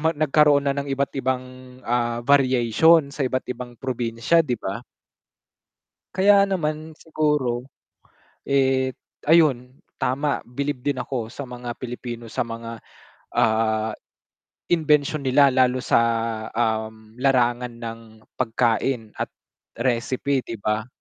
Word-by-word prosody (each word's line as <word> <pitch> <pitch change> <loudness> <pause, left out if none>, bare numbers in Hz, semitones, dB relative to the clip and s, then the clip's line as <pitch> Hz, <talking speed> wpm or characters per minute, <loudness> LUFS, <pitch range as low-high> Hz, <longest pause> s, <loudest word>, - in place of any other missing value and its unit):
ma 160 0 +1
nagkaroon 150 -1 +4
na 140 - +2
ng 140 0 -4
iba't-ibang, 135 -2 -1 0.4
ah, 120 0 -1
variation 140 +3 +4
sa 140 -3 -1
iba't-ibang 125 -1 -4
probinsya 120 +5 +1
'di 125 -7 -1
ba? 100 +2 -5 1.3
Kaya 200 +1 +5
naman 155 -4 -3
siguro, 150 -6 -1 0.8
eh, 130 -1 +2 0.3
ayun 140 -6 +3 0.2
tama, 140 +3 -1
bilib 135 +1 -4
din 145 -3 -1
ako 115 -4 -4
sa 140 -3 -7
mga 125 -1 -6
Pilipino 120 -2 -6
sa 110 - -2
mga, 115 0 -7 0.6
ah, 110 0 +2 0.8
imbensyon 150 -3 +2
nila 135 +2 +5
lalo 130 -1 +2
sa, - - +3 0.6
um, 110 -1 -2
larangan 125 -2 +2
ng 115 -1 -6 0.4
pagkain 115 -1 0
at - - -1 0.5
recipe 130 +2 0
'di 115 -2 -7
ba? 110 0 -1
130 Hz, 110 wpm, -23 LUFS, 120-140 Hz, 1.3 s, Kaya